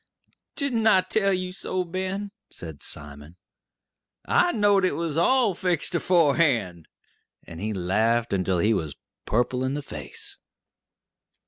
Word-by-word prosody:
"Didn't 245 -7 +1
I 190 -4 +6
tell 195 +2 +1
you 185 -1 -2
so, 185 0 -3
Ben?" 190 +3 -4 0.2
said 80 -4 -10
Simon. 75 +3 -8 0.9
"I 355 - +3
knowed 205 - +3
it 185 - +2
was 165 -3 -2
all 225 +5 +3
fixed 175 -2 -1
aforehand," 145 - +2 0.6
and 85 +1 -10
he 110 +1 -2
laughed 110 +5 +1
until 95 -1 +1
he 105 +6 +3
was 80 -8 -3 0.3
purple 125 +3 0
in 130 +2 -1
the 145 - -4
face. 75 - -5
155 Hz, 130 wpm, -25 LUFS, -, 0.9 s, I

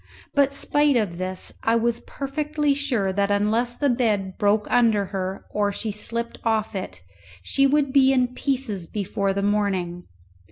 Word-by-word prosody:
But, 280 -1 +3
spite 290 0 +2
of 190 -6 -1
this, 185 0 -3
I 225 - +2
was 235 0 +1
perfectly 295 +1 -2
sure 250 -9 0
that 200 +1 +1
unless 220 +4 +1
the 285 - 0
bed 215 -7 0
broke 205 0 +2
under 225 -4 +3
her 190 0 -4
or 205 -1 +1
she 215 +2 -4
slipt 230 +3 -4
off 220 -2 0
it, 90 - -6 0.4
she 275 - +3
would 280 -1 +1
be 270 -1 +6
in 250 -2 +1
pieces 250 -10 -2
before 200 0 -2
the 200 +1 -2
morning. 190 -4 -1
220 Hz, 160 wpm, -24 LUFS, 200-265 Hz, 0.4 s, be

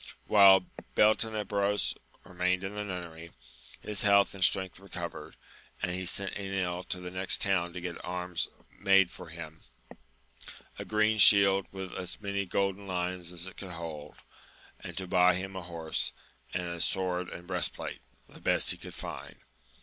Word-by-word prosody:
HILE 95 -3 +8 0.3
Beltenebros 105 -2 +2 0.3
remained 90 +1 -1
in 95 +1 -4
the 105 0 -3
nunnery, 85 -4 -7 0.5
his 105 -2 -2
health 100 -1 +4
and 95 -2 -2
strength 95 -1 +2
recovered, 85 -5 -7 0.4
and 90 - -2
he 90 0 -3
sent 100 +1 0
Enil 95 -3 -2
to 90 - -1
the 90 0 -7
next 95 0 +3
town 95 -4 +1
to 90 - -6
get 85 -1 -6
arms 90 -1 -2 0.3
made 95 -2 +4
for - - -11
him, 80 -1 -9 1.2
a - - -5
green 110 0 +2
shield 100 -1 +8
with 95 -1 -7
as 90 -1 -5
many 100 -2 -3
golden 100 +1 -1
lions 90 -1 -3
as 90 -1 -3
it 95 - -10
could 95 -3 -8
hold, 80 -3 -7 0.6
and 90 -2 -9
to 95 - -2
buy 90 -1 +4
him 95 +1 -5
a 95 - -4
horse, 85 -2 -3 0.4
and 90 0 -2
a 85 -1 -4
sword 90 0 0
and 85 - -9
breastplate, 90 -3 -3 0.3
the - - -16
best - - +3
he - - -2
could - - -10
find. - - -7
90 Hz, 160 wpm, -30 LUFS, 90-100 Hz, 1.2 s, HILE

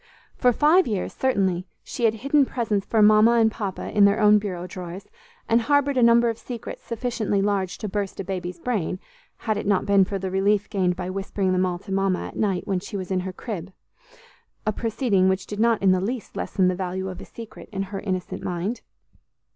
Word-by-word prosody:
For 250 - +3
five 310 +9 +4
years, 205 -5 -2
certainly, 190 -8 0 0.2
she 240 - -2
had 225 -1 +3
hidden 280 +5 +3
presents 225 -6 -1
for 220 -2 +3
Mama 215 +2 +6
and 225 -2 +4
Papa 200 -4 -5
in 205 -1 +7
their 200 +1 +3
own 210 -1 +6
bureau 185 -4 -5
drawers, 180 0 -8 0.4
and 230 +1 +3
harbored 285 +2 +2
a 255 - +2
number 235 0 +5
of 230 -1 -2
secrets 240 -3 -7
sufficiently 230 -3 -2
large 195 -2 0
to 215 - -5
burst 200 -1 -3
a - - -2
baby's 180 -1 -4
brain, 185 -2 -2 0.5
had 215 -2 +1
it 210 - -4
not 200 -2 +2
been 200 -1 +5
for 195 +1 -3
the 190 -1 -4
relief 200 +2 +2
gained 180 -3 +1
by 180 0 -4
whispering 195 0 -1
them 185 0 +2
all 175 -1 -2
to 195 +2 -11
Mama, 195 -1 0
at - - -9
night, 195 -4 0
when 190 -3 0
she 205 +2 -6
was 185 -1 -6
in 185 - +1
her 185 +1 -4
crib, 185 -2 -6 0.9
a 215 - +2
proceeding 215 -4 +1
which 190 0 -1
did 210 - -6
not 230 -2 +2
in 190 - +5
the 185 -1 +2
least 230 +4 -4
lessen 185 -2 0
the 185 - +2
value 185 +1 -3
of 185 -1 -7
a - - -9
secret 230 -2 -11
in 195 -1 -2
her 195 - -2
innocent 185 -3 -4
mind. 180 +7 -3
200 Hz, 215 wpm, -24 LUFS, 185-225 Hz, 0.9 s, in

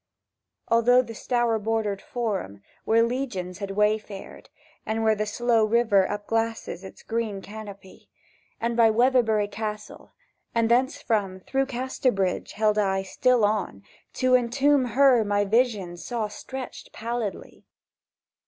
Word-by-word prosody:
Along 230 0 +3
through 250 +1 +6
the 230 - -9
Stour 235 0 0
bordered 215 -2 -1
Forum, 195 - -4 0.2
Where 225 +1 +4
Legions 230 -8 -3
had 200 -1 -4
wayfared, 210 -1 -2 0.3
And 220 +1 -2
where 220 0 +4
the 215 0 -2
slow 230 +1 +2
river 215 -3 +3
upglasses 220 -2 -2
Its 190 - -12
green 225 -3 -2
canopy, 200 -1 -11 0.5
And 235 0 -1
by 230 -1 +5
Weatherbury 225 -2 +3
Castle, 210 +1 -6 0.4
and 230 0 +2
thencefrom 230 -7 0
Through 270 0 0
Casterbridge 250 -7 -1
held 215 0 +2
I 195 -2 +1
Still 245 +3 +2
on, 205 - -2 0.3
to 255 0 +1
entomb 260 +3 +3
her 255 -1 +4
my 205 0 +1
vision 205 -5 +1
Saw 225 +4 -3
stretched 260 +5 -8
pallidly. 230 -2 -5
220 Hz, 125 wpm, -25 LUFS, 205-240 Hz, 0.5 s, through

